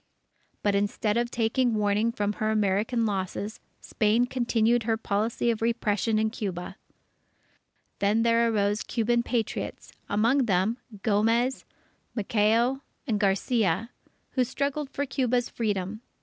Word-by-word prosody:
But 205 Hz, -, +2 dB
instead 205 Hz, +1 st, 0 dB
of 240 Hz, 0 st, +1 dB
taking 235 Hz, +1 st, +1 dB
warning 210 Hz, +2 st, +2 dB
from 210 Hz, -3 st, -1 dB
her 215 Hz, +1 st, -1 dB
American 215 Hz, +2 st, +1 dB
losses, 200 Hz, +1 st, -3 dB, 0.2 s
Spain 220 Hz, +3 st, +2 dB
continued 240 Hz, -2 st, +1 dB
her 225 Hz, 0 st, 0 dB
policy 225 Hz, +2 st, 0 dB
of 225 Hz, -, -4 dB
repression 225 Hz, -1 st, +1 dB
in 220 Hz, 0 st, +1 dB
Cuba. 190 Hz, -6 st, -5 dB, 1.2 s
Then 210 Hz, +3 st, +2 dB
there 230 Hz, 0 st, +3 dB
arose 205 Hz, 0 st, +1 dB
Cuban 235 Hz, 0 st, +1 dB
Patriots, 235 Hz, -2 st, -3 dB, 0.2 s
among 230 Hz, +6 st, +3 dB
them, 195 Hz, +5 st, +1 dB, 0.2 s
Gomez, 230 Hz, +4 st, +2 dB, 0.5 s
Maceo, 230 Hz, +4 st, +2 dB, 0.2 s
and 220 Hz, -7 st, 0 dB
Garcia, 200 Hz, +1 st, +1 dB, 0.4 s
who 255 Hz, -, +2 dB
struggled 280 Hz, +3 st, -2 dB
for 285 Hz, -, -2 dB
Cuba's 250 Hz, -2 st, 0 dB
Freedom. 205 Hz, -1 st, -2 dB
225 Hz, 120 wpm, -27 LUFS, 205-240 Hz, 1.2 s, there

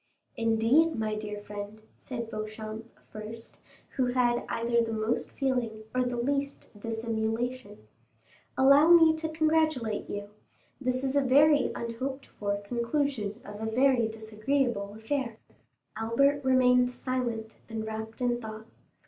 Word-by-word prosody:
"Indeed, 230 Hz, +8 st, +3 dB
my 220 Hz, -1 st, -1 dB
dear 210 Hz, -1 st, -4 dB
friend," 205 Hz, +1 st, -7 dB, 0.2 s
said 235 Hz, -3 st, -6 dB
Beauchamp 215 Hz, +1 st, -6 dB, 0.2 s
first, 220 Hz, +2 st, -9 dB, 0.4 s
who 255 Hz, -2 st, +2 dB
had 245 Hz, -1 st, +1 dB
either 235 Hz, 0 st, +1 dB
the 225 Hz, -1 st, -2 dB
most 220 Hz, +2 st, -1 dB
feeling 245 Hz, -5 st, -2 dB
or 255 Hz, -, +2 dB
the 245 Hz, -1 st, -1 dB
least 280 Hz, +3 st, -2 dB
dissimulation, 225 Hz, +1 st, -3 dB, 0.7 s
"allow 280 Hz, +3 st, +7 dB
me 325 Hz, -2 st, +7 dB
to 320 Hz, 0 st, -3 dB
congratulate 310 Hz, -8 st, +1 dB
you; 205 Hz, 0 st, -5 dB, 0.5 s
this 255 Hz, +1 st, 0 dB
is 270 Hz, 0 st, -1 dB
a 285 Hz, -, +5 dB
very 285 Hz, +2 st, +5 dB
unhoped 260 Hz, +4 st, -4 dB
for 200 Hz, -1 st, -3 dB
conclusion 235 Hz, -1 st, -1 dB
of 205 Hz, +1 st, -8 dB
a 220 Hz, 0 st, -2 dB
very 255 Hz, -1 st, +3 dB
disagreeable 220 Hz, 0 st, -1 dB
affair." 230 Hz, +1 st, -3 dB, 0.6 s
Albert 275 Hz, +6 st, +2 dB
remained 250 Hz, -1 st, +4 dB
silent 245 Hz, -3 st, -3 dB
and 220 Hz, -1 st, -4 dB
wrapped 220 Hz, +2 st, -6 dB
in 240 Hz, -1 st, +1 dB
thought. 220 Hz, -1 st, -8 dB
235 Hz, 130 wpm, -29 LUFS, 220-265 Hz, 0.7 s, allow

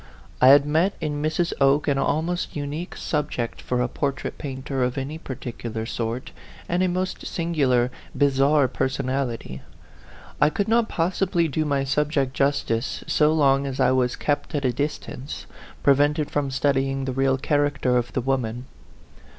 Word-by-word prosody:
I 130 Hz, -, +7 dB
had 140 Hz, +1 st, +8 dB
met 160 Hz, +7 st, +2 dB
in 150 Hz, -2 st, -2 dB
Mrs. 160 Hz, +3 st, 0 dB
Oke 140 Hz, +2 st, +4 dB
an 140 Hz, -2 st, +2 dB
almost 170 Hz, +5 st, -1 dB
unique 150 Hz, +4 st, -4 dB
sub 150 Hz, -1 st, -1 dB
ject 120 Hz, -2 st, -4 dB
for 125 Hz, -1 st, -1 dB
a -, -, 0 dB
portrait 140 Hz, +2 st, -3 dB
painter 135 Hz, -1 st, -4 dB
of 125 Hz, +2 st, -1 dB
any 140 Hz, +4 st, -4 dB
particular 115 Hz, -5 st, -5 dB
sort, 115 Hz, +2 st, -4 dB, 0.4 s
and 175 Hz, +1 st, 0 dB
a 185 Hz, -, +3 dB
most 185 Hz, +1 st, -2 dB
singular, 135 Hz, -8 st, +1 dB, 0.3 s
bizarre 140 Hz, 0 st, +4 dB
personality. 130 Hz, -, -2 dB, 0.8 s
I 150 Hz, -, +6 dB
could 200 Hz, +6 st, -1 dB
not 230 Hz, 0 st, +2 dB
possibly 175 Hz, 0 st, +1 dB
do 155 Hz, +1 st, -1 dB
my 140 Hz, -2 st, +1 dB
subject 135 Hz, -1 st, 0 dB
justice 135 Hz, -4 st, 0 dB
so 150 Hz, 0 st, +3 dB
long 140 Hz, -3 st, +3 dB
as 135 Hz, -1 st, -5 dB
I -, -, +4 dB
was 125 Hz, -1 st, +1 dB
kept 145 Hz, +2 st, -2 dB
at 140 Hz, -2 st, -1 dB
a 125 Hz, -, +2 dB
distance, 145 Hz, 0 st, -4 dB, 0.4 s
prevented 145 Hz, +2 st, +3 dB
from 145 Hz, -2 st, 0 dB
studying 135 Hz, 0 st, 0 dB
the 130 Hz, -, -2 dB
real 135 Hz, 0 st, +2 dB
character 145 Hz, -3 st, +1 dB
of 120 Hz, -1 st, 0 dB
the 130 Hz, -, 0 dB
wom 135 Hz, 0 st, +1 dB
an. 120 Hz, +3 st, -6 dB
140 Hz, 160 wpm, -24 LUFS, 130-150 Hz, 0.8 s, had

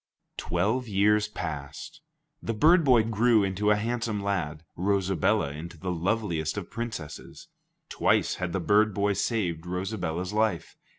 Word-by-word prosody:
Twelve 110 Hz, +9 st, -1 dB
years 105 Hz, +1 st, +3 dB
passed. 85 Hz, -, -7 dB, 0.4 s
The 115 Hz, -, -3 dB
bird 165 Hz, +9 st, +5 dB
boy 125 Hz, -5 st, +5 dB
grew 115 Hz, 0 st, +3 dB
into 100 Hz, +2 st, 0 dB
a 105 Hz, -, +5 dB
handsome 115 Hz, 0 st, -2 dB
lad; 85 Hz, -6 st, -2 dB
Rosabella 95 Hz, -6 st, +1 dB
into 80 Hz, +3 st, -8 dB
the 90 Hz, +3 st, -4 dB
loveliest 90 Hz, -2 st, -1 dB
of 100 Hz, -, -6 dB
princesses. 115 Hz, -10 st, -7 dB, 0.4 s
Twice -, -, +1 dB
had 90 Hz, -1 st, -2 dB
the 95 Hz, -, -1 dB
bird 105 Hz, +3 st, +3 dB
boy 100 Hz, 0 st, +1 dB
saved 90 Hz, -7 st, -2 dB
Rosabella's 90 Hz, -1 st, -3 dB
life. 105 Hz, -5 st, 0 dB
100 Hz, 135 wpm, -27 LUFS, 85-110 Hz, 0.4 s, bird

